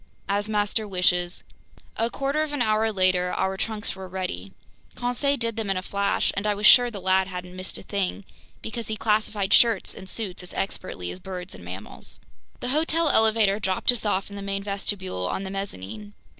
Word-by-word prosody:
"As 205 +2 0
master 210 +1 +1
wishes." 180 -2 +1 0.5
A 230 +1 +1
quarter 275 +4 -1
of 310 -1 -2
an 290 - -1
hour 220 0 +2
later, 185 -2 +3
our 190 0 0
trunks 215 +1 -3
were 190 -1 -7
ready. 180 - -4 0.4
Conseil 265 +4 +1
did 230 -2 -1
them 220 -3 -2
in 195 - +1
a 185 - -3
flash, 200 +1 +1
and 200 +2 -1
I 210 - +2
was 205 +1 -2
sure 245 +2 +8
the 210 -4 -7
lad 190 0 +3
hadn't 180 -1 -6
missed 185 0 -5
a - - -10
thing, 200 -1 -2 0.4
because 225 0 -5
he 220 - -2
classified 210 -2 +1
shirts 230 -5 +5
and 190 -1 -8
suits 195 -5 -3
as 180 - -8
expertly 90 - -3
as 90 - -8
birds 180 - -6
and - - -11
mammals. - - -5 0.4
The 245 - -2
hotel 320 +3 +2
elevator 220 -4 +4
dropped 190 +2 +3
us 245 - -2
off 205 -1 0
in - - -7
the 200 - -5
main 195 0 -2
vestibule 195 - -2
on 190 - -2
the 190 - -5
mezzanine. 105 - -6
200 Hz, 200 wpm, -25 LUFS, 185-220 Hz, 0.5 s, sure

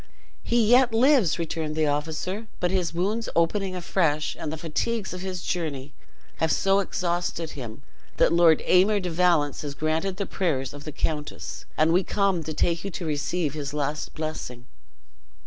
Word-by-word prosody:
"He 235 -2 +2
yet 245 0 +5
lives," 250 - +4
returned 160 -2 -3
the 155 0 +2
officer; 160 +8 -2
"but 180 0 0
his 185 -3 0
wounds 200 +6 -1
opening 185 +3 +1
afresh, 165 -4 0
and 150 - -3
the 160 - -4
fatigues 190 +7 -2
of 180 - -6
his 185 -2 -4
journey, 145 -5 -3 0.4
have 160 -1 +1
so 195 0 +3
exhausted 175 -3 -2
him 125 0 -8 0.3
that - - +4
Lord 170 -2 +5
Aymer 195 +3 +4
de 180 -3 -3
Valence 165 -4 +2
has 145 -1 -5
granted 160 +5 -1
the 200 - -2
prayers 140 -11 -1
of 145 0 -10
the 155 - -5
countess, 150 0 -4
and 160 +1 +4
we 185 +2 +4
come 195 -3 +1
to 155 - -3
take 170 -1 +1
you 200 - -3
to 175 -1 -5
receive 155 +1 -1
his 145 -1 -5
last 150 +1 -3
blessing." 155 -6 -5
170 Hz, 170 wpm, -26 LUFS, 155-190 Hz, 0.4 s, yet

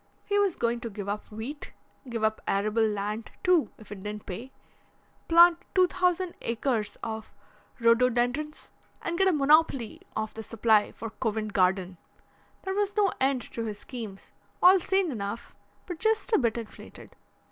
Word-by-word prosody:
He 410 0 +1
was 395 -4 +2
going 235 0 0
to 235 -1 -5
give 200 -1 -7
up 205 +1 -3
wheat, 235 +8 -7 0.4
give 230 -2 -3
up 220 0 +1
arable 210 +3 +1
land, 210 +1 -3
too, 360 -4 +4
if 215 -2 -15
it 200 -2 -7
didn't 210 +1 -6
pay, 230 +8 -7 0.8
plant 340 0 +7 0.2
two 370 -1 +6
thousand 360 0 0
acres 230 -3 -1
of 220 -1 -5 0.5
rhododendrons 245 +5 +2 0.3
and 335 - -2
get 385 +2 +3
a - - +5
monopoly 290 -5 +3
of 215 0 -3
the 220 - -6
supply 220 -1 +2
for 225 -1 -7
Covent 220 -3 -2
Garden 185 -1 +1 0.7
there 380 - -2
was 410 +1 -1
no 405 -2 +3
end 265 -2 +2
to 230 - -3
his 210 -2 -4
schemes, 220 -5 -8 0.3
all 370 +1 +7
sane 380 -1 +1
enough 210 -1 -5 0.3
but 355 -3 -6
just 445 +1 +1
a - - +6
bit 235 -3 +1
inflated. 225 -2 -10
235 Hz, 160 wpm, -28 LUFS, 215-335 Hz, 0.8 s, plant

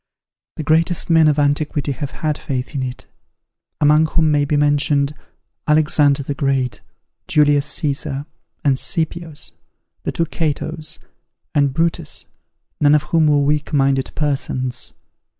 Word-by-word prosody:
The 155 - -4
greatest 165 +2 +1
men 160 -1 +6
of 150 -1 +3
antiquity 145 0 0
have 140 +1 -4
had 155 +1 -2
faith 130 -1 -4
in 140 - -2
it; 130 -1 -5 0.7
among 150 +2 +4
whom 160 -1 +2
may 145 -1 +2
be 145 +1 +1
mentioned 145 0 +2 0.5
Alexander 150 -2 +3
the 145 - -3
Great, 135 -2 -1 0.5
Julius 145 -4 +3
Caesar, 145 -1 -3 0.4
the 140 -2 +3
Scipios, 160 -2 -1 0.5
the - - -3
two 165 - 0
Catos, 155 0 -3 0.6
and 140 -2 +3
Brutus, 165 +4 -1 0.5
none 145 0 +5
of 150 - +2
whom 160 0 +2
were 145 -1 +4
weak 150 +1 0
minded 135 -2 +2
persons. 130 -4 -2
145 Hz, 135 wpm, -19 LUFS, 140-155 Hz, 0.7 s, men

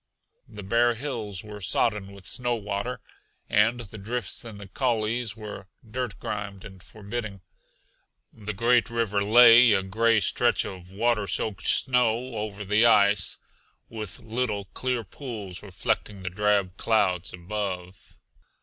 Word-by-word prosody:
The 105 -1 -10
bare 115 +4 +2
hills 115 -7 -3
were 105 -1 -9
sodden 105 +1 +1
with 100 -2 -14
snow 120 -1 0
water, 105 +3 -4 0.5
and 110 +4 +2
the 110 -1 -10
drifts 120 +5 -3
in 115 -3 -9
the 100 -1 -10
coulees 115 0 -1
were 105 -3 -8 0.2
dirt 120 -2 -4
grimed 100 -2 -6
and 95 -3 -12
forbidding. 105 -1 -6 0.9
The 105 -1 -6
great 120 +3 +3
river 110 -4 0
lay, 115 +2 +8
a 95 -1 +1
gray 115 +4 +2
stretch 95 - +2
of 90 -1 -8
water 105 0 0
soaked 105 -2 -1
snow 125 -1 +3
over 105 -1 -5
the 105 +3 +3
ice, 100 -5 +4 0.5
with 110 -4 -6
little, 110 -3 -2
clear 125 -2 -2
pools 105 -5 -7
reflecting 100 0 -2
the 90 - -4
drab 100 -1 +1
clouds 95 -5 +1
above. 90 0 -6
105 Hz, 135 wpm, -26 LUFS, 100-115 Hz, 0.9 s, lay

